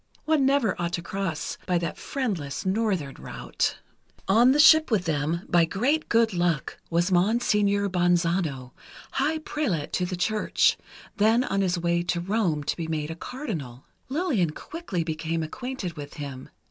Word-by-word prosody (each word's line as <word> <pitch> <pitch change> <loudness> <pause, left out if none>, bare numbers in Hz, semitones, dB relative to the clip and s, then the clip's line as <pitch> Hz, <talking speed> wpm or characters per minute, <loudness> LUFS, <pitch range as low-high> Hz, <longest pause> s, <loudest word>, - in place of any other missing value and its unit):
One 310 -4 +3
never 270 -8 +2
ought 170 0 -2
to 170 - -2
cross 170 -4 -3
by 180 -1 +2
that 170 -2 -2
friendless 195 - -3
Northern 190 -8 0
route. - - -2 0.5
On 230 +6 +6
the 280 - +3
ship 315 +1 +7
with 210 -6 +1
them, 160 +2 0
by 175 -1 +4
great 255 - 0
good 230 -2 +3
luck, 175 -5 -1
was 175 +2 +1
Monseigneur 200 +1 +2
Bonzano, 175 -7 +1 0.4
high 295 +4 0
prelate 275 - -2
of 180 - 0
the 185 - -2
Church, 215 +4 +2 0.4
then 225 +4 +4
on 195 -5 0
his 185 -2 +1
way 170 0 +1
to 175 0 -1
Rome 175 -5 0
to - - -1
be 165 -2 -4
made 155 -1 -2
a - - -5
Cardinal. 165 - -6 0.2
Lillian 270 - +1
quickly 190 - -4
became 160 0 -2
acquainted 245 +1 -5
with 145 -1 -9
him. 140 -4 -7
180 Hz, 160 wpm, -26 LUFS, 165-225 Hz, 0.5 s, ship